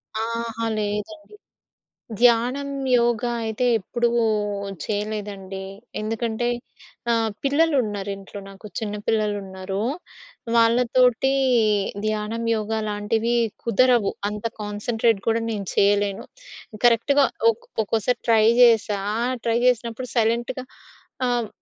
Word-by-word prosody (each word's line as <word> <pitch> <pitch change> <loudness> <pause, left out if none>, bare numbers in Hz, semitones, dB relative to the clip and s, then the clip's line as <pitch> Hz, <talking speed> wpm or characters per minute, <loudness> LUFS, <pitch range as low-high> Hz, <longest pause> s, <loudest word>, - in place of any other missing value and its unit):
అహా, 230 0 -3
లేదండి. 210 - -4 0.8
ధ్యానం, 245 +4 +3 0.3
యోగ 235 -1 +2 0.2
అయితే 220 +3 -1
ఎప్పుడూ 235 +4 -1 0.8
చేయలేదండి. 205 -2 -4 0.4
ఎందుకంటే 225 +2 -2 0.6
ఆహ్, 225 -1 +2
పిల్లలున్నారింట్లో 210 -10 0
నాకు. 195 +2 -14
చిన్న 210 -2 -4
పిల్లలున్నారు. 200 -3 -2 0.7
వాళ్ళతోటి 245 +2 +3 0.7
ధ్యానం, 215 +2 -2
యోగా 220 0 -2
లాంటివి 220 +3 0 0.3
కుదరవు. 235 -1 +3 0.2
అంత 210 +1 -6 0.2
కాన్సంట్రేట్ 210 +1 0
కూడా 230 0 +2
నేను 205 -3 -3
చేయలేను. 200 0 +2 0.6
కరెక్ట్‌గా 275 +5 +4 0.3
ఒక్కో 225 - -14 0.2
ఒక్కోసారి 225 +3 0
ట్రై 220 -2 +5 0.2
జేశా. 225 -4 +5 0.4
ట్రై 230 0 +1
జేసినప్పుడు 245 0 0
సైలెంట్‌గా 240 +3 0 0.6
ఆహ్, 240 -2 0
225 Hz, 90 wpm, -23 LUFS, 210-240 Hz, 0.8 s, ట్రై